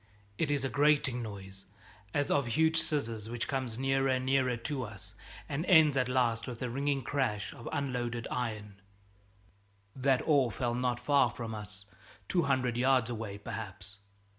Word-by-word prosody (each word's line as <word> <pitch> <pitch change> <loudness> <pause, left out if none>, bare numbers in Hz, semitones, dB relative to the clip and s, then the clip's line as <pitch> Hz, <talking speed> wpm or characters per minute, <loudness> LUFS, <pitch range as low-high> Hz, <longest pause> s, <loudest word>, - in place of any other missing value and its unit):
It 160 - +1
is 140 -2 +1
a - - 0
grating 140 -4 +3
noise 100 -3 -8 0.5
as 145 +4 0
of 140 -4 +2
huge 160 +7 +3
scissors 115 -9 -1
which 120 0 -3
comes 130 -5 -2
near 135 +1 +1
and 130 -1 +1
nearer 130 -2 +2
to 135 +3 -3
us, 105 -5 -8 0.3
and 150 +3 -2
ends 160 -6 +6
at 130 -1 +1
last 120 -3 +1
with 120 -2 -6
a 125 - -2
ringing 140 +1 0
crash 115 -6 -1
of 120 - -8
unloaded 120 -4 -2
iron. 105 -5 -4 1.1
That 130 -1 +2
ore 140 -6 +4
fell 120 +1 -1
not 125 0 0
far 140 0 +3
from 115 -1 -6
us 100 -2 -7 0.4
two 180 - +2
hundred 130 -5 +1
yards 125 -2 +3
away, 110 -3 -5
perhaps. 100 -1 -7
125 Hz, 165 wpm, -31 LUFS, 115-135 Hz, 1.1 s, ends